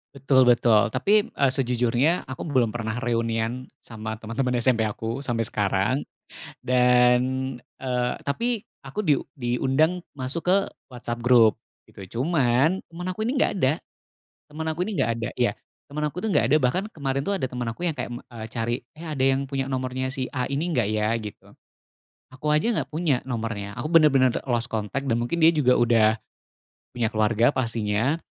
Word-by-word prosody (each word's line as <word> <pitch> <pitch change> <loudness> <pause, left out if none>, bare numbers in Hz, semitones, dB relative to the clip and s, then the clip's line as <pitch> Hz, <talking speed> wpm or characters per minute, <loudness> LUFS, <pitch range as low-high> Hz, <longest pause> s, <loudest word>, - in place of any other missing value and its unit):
Betul 135 -1 +4
betul 115 -3 +4
tapi, 205 +11 +3
eee, 140 -1 +2
sejujurnya 125 +5 +1
aku 130 - -6
belum 130 -7 +2
pernah 110 -1 -4
reunian 115 0 -1 0.2
sama 110 -1 -6
teman-teman 120 +3 -2
SMP 115 -2 +3
aku 115 +5 -3
sampai 120 -2 -1
sekarang, 100 +1 +1 0.7
dan, 125 -1 +4 0.4
eee, 125 0 -3
tapi 230 +9 -1 0.2
aku 210 - -5
diu 145 -7 +1
diundang 135 +7 +1 0.2
masuk 135 +6 -3
ke 185 +2 +5 0.3
WhatsApp 120 -2 -6
grup, 115 -3 +5 0.2
gitu, 95 -3 -12 0.2
cuman 145 +2 +2
teman 175 +2 -7
aku 215 +4 -3
ini 255 - -1
nggak 260 - +2
ada 130 -1 +3 0.7
teman 160 +2 -6
aku 165 +3 -1
ini 220 - -4
nggak 115 - +1
ada, 115 -1 -3
ya, - - +1 0.4
teman 150 +2 -4
aku, 150 +4 -4
tuh, 220 - -2
nggak 205 - +3
ada. - - +6
Bahkan 140 +8 +1
kemarin, 135 -2 -2
tuh, 200 - -2
ada 130 - -1
temen 125 -1 -5
aku 175 +10 -4
yang 160 - -1
kayak, 125 -2 -5
me 120 - -5 0.3
cari, 120 +1 -2 0.2
"Eh, 170 - -7
ada 145 -4 -2
yang 135 +1 +2
punya 135 0 -2
nomornya 130 0 -2
si 130 -1 -2
A 125 - 0
ini 145 +5 -1
nggak, 120 -4 +2
ya?" 105 0 0
Gitu. 105 -3 -7 0.9
Aku 135 +4 -3
aja 150 +1 +2
nggak - - -2
punya 155 -5 0
nomornya, 110 -5 -4
aku - - -4
benar-benar, 145 -6 +5
eee, - - -5
lost 120 -1 +1
contact 110 +4 -3
dan 115 - +2
mungkin 120 +8 -2
dia 165 - +6
juga 130 -5 +3
udah 115 -2 +4 0.7
punya 120 -2 -1
keluarga 110 +4 +3
pastinya, 115 +2 0
130 Hz, 175 wpm, -25 LUFS, 115-145 Hz, 0.9 s, ada